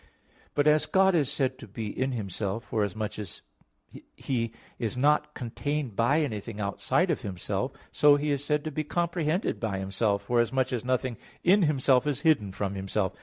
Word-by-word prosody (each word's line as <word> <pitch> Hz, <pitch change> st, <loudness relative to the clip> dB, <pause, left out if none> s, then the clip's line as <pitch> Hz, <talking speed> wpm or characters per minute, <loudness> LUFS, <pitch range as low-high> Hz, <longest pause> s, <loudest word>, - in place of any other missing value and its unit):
But 145 Hz, -, +3 dB
as 150 Hz, 0 st, +4 dB
God 190 Hz, 0 st, +4 dB
is 145 Hz, -5 st, +2 dB
said 130 Hz, -3 st, -1 dB
to -, -, -10 dB
be 110 Hz, +3 st, -5 dB
in 130 Hz, +5 st, -2 dB
Himself, 100 Hz, 0 st, -3 dB
forasmuch 105 Hz, 0 st, -2 dB
as 100 Hz, -5 st, -7 dB, 0.7 s
He 115 Hz, -4 st, -2 dB, 0.3 s
is 115 Hz, 0 st, -2 dB
not 150 Hz, +2 st, +2 dB
contained 135 Hz, 0 st, -3 dB
by 140 Hz, +9 st, +3 dB
anything 110 Hz, -5 st, -4 dB
outside 100 Hz, -1 st, +1 dB
of -, -, -1 dB
Himself; 90 Hz, -3 st, -3 dB, 0.2 s
so 145 Hz, -1 st, +6 dB
He 145 Hz, +1 st, 0 dB
is 140 Hz, -1 st, -1 dB
said 150 Hz, 0 st, 0 dB
to 155 Hz, -, -4 dB
be 155 Hz, +2 st, -2 dB
comprehended 170 Hz, +2 st, -1 dB
by 105 Hz, -4 st, -2 dB
Himself, 100 Hz, +1 st, 0 dB
forasmuch 125 Hz, +4 st, +1 dB
as 120 Hz, -, -2 dB
nothing 125 Hz, -2 st, -1 dB, 0.2 s
in 195 Hz, +4 st, +5 dB
Himself 135 Hz, -4 st, +3 dB
is 145 Hz, -1 st, -1 dB
hidden 140 Hz, -12 st, +3 dB
from 100 Hz, +1 st, -3 dB
Himself. 95 Hz, 0 st, -1 dB
125 Hz, 170 wpm, -28 LUFS, 105-150 Hz, 0.7 s, so